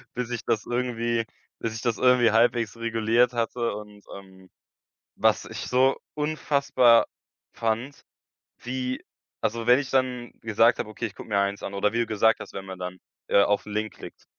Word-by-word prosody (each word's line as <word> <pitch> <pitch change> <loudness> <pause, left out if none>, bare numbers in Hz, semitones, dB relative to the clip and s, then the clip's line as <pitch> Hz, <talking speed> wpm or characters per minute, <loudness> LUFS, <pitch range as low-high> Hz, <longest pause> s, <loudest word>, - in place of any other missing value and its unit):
bis 125 -1 -3
ich 115 - -3
das 110 - 0
irgendwie 120 -2 -1 0.3
bis 115 -1 -3
ich 115 - -5
das 115 -4 0
irgendwie 125 -3 +5
halbwegs 115 -1 +2
reguliert 115 +1 +2
hatte 115 0 -1
und, 105 -1 -11
ähm. 95 -1 -15 0.7
Was - - +3
ich - - -7
so 130 +2 +3 0.2
unfassbar 140 -5 +3 0.5
fand, 115 +5 -3 0.6
wie 130 +1 -4 0.4
also, 115 +1 -2
wenn 125 +2 +6
ich 140 -2 -5
dann 125 -2 0
gesagt 115 +2 +3
habe: - - -2
„Okay, 110 +2 -5
ich 100 - -14
gucke - - -10
mir 100 -3 +1
eins 100 0 -1
an“ 100 - -6
oder 100 +1 +1
wie 115 - -2
du 120 - +2
gesagt 110 0 +2
hast, - - -9
wenn 95 - -6
man 95 -1 -8
dann, 90 0 -6 0.3
äh, 100 - +5
auf 100 0 +1
'n 105 - -8
Link 110 +1 -2
klickt. - - -12
115 Hz, 185 wpm, -26 LUFS, 105-125 Hz, 0.7 s, wenn